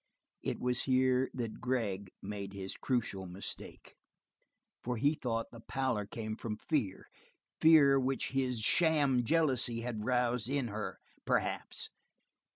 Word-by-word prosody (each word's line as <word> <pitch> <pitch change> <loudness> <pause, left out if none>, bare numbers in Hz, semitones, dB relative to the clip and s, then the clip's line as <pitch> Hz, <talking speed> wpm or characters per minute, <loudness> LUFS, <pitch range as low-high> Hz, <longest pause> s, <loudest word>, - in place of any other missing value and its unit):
It - - -2
was 125 0 0
here 130 0 +3
that 115 -4 -4
Gregg 105 -6 -1
made 100 -1 -5
his 95 -1 -5
crucial 110 -7 -1
mistake, 90 +3 -7 0.9
for 125 0 -1
he 145 +6 +3
thought 115 -6 -2
the 115 - -10
pallor 120 -4 -1
came 110 0 -4
from 110 -1 -4
fear, 115 -12 -1 0.5
fear 145 -4 +7
which 130 0 0
his 130 -3 0
sham 145 -2 +4
jealousy 130 -5 +1
had 115 -3 -3
roused 125 -1 +1
in 135 -4 0
her, 105 -1 -4 0.3
perhaps. - - -1
125 Hz, 130 wpm, -33 LUFS, 110-130 Hz, 0.9 s, fear